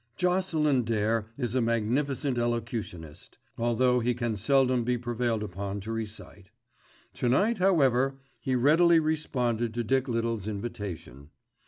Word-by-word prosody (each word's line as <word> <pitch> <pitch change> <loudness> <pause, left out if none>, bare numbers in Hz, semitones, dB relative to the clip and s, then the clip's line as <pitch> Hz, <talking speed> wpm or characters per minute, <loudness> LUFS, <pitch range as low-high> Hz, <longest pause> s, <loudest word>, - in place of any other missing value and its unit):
Jocelyn 170 -7 +2
Dare 110 -1 0
is 120 -4 -2
a 130 - +2
magnificent 125 +4 0
elocutionist, 115 -9 -4 0.2
although 120 +2 +2
he 120 +1 0
can 120 -2 -2
seldom 130 +3 +2
be 125 +1 0
prevailed 120 -2 -1
upon 100 0 -5
to 110 +3 -6
recite. 105 -3 -7 0.6
To 120 - -1
night, 205 - +2
however, 135 -8 +3 0.2
he 130 - -1
readily 165 +6 +5
responded 125 -7 -1
to 120 - -1
Dick 130 +4 +1
Little's 115 -3 -2
invitation. 100 - -6
120 Hz, 130 wpm, -28 LUFS, 110-135 Hz, 0.6 s, readily